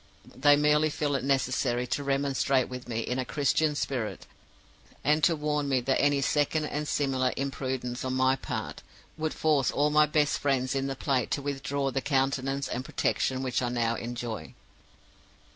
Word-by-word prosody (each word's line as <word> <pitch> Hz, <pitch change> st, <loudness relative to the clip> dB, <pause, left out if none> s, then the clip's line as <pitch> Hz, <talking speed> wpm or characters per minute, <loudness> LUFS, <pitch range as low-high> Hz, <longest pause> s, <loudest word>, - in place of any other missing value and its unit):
They 145 Hz, +2 st, +5 dB
merely 150 Hz, +1 st, +3 dB
feel 145 Hz, -1 st, -1 dB
it 135 Hz, -, -1 dB
necessary 130 Hz, -2 st, +1 dB
to 125 Hz, +4 st, -2 dB
remonstrate 135 Hz, -1 st, +1 dB
with 125 Hz, -1 st, -8 dB
me 115 Hz, -1 st, -1 dB
in 125 Hz, +3 st, -2 dB
a -, -, 0 dB
Christian 150 Hz, +3 st, +1 dB
spirit, 125 Hz, -6 st, -3 dB, 0.8 s
and 150 Hz, +2 st, +2 dB
to 165 Hz, -, +4 dB
warn 150 Hz, -1 st, -1 dB
me 130 Hz, -2 st, +3 dB
that 135 Hz, +2 st, +1 dB
any 145 Hz, -1 st, +3 dB
second 150 Hz, +2 st, +1 dB
and 150 Hz, 0 st, -3 dB
similar 130 Hz, -3 st, 0 dB
imprudence 130 Hz, -2 st, -3 dB
on 130 Hz, 0 st, -2 dB
my 130 Hz, 0 st, +3 dB
part -, -, -5 dB, 0.3 s
would 155 Hz, 0 st, -3 dB
force 150 Hz, -4 st, +2 dB
all 145 Hz, +1 st, +1 dB
my 150 Hz, 0 st, +5 dB
best 150 Hz, 0 st, +1 dB
friends 130 Hz, -2 st, 0 dB
in 135 Hz, 0 st, -1 dB
the 135 Hz, -, -3 dB
place 130 Hz, -3 st, 0 dB
to 140 Hz, -, -2 dB
withdraw 140 Hz, -1 st, -2 dB
the 135 Hz, -, -1 dB
countenance 135 Hz, 0 st, 0 dB
and 125 Hz, -, -3 dB
protection 130 Hz, 0 st, -1 dB
which 130 Hz, -1 st, 0 dB
I 125 Hz, -, 0 dB
now 115 Hz, -1 st, 0 dB
enjoy. 120 Hz, -1 st, -5 dB
135 Hz, 175 wpm, -28 LUFS, 130-145 Hz, 0.8 s, They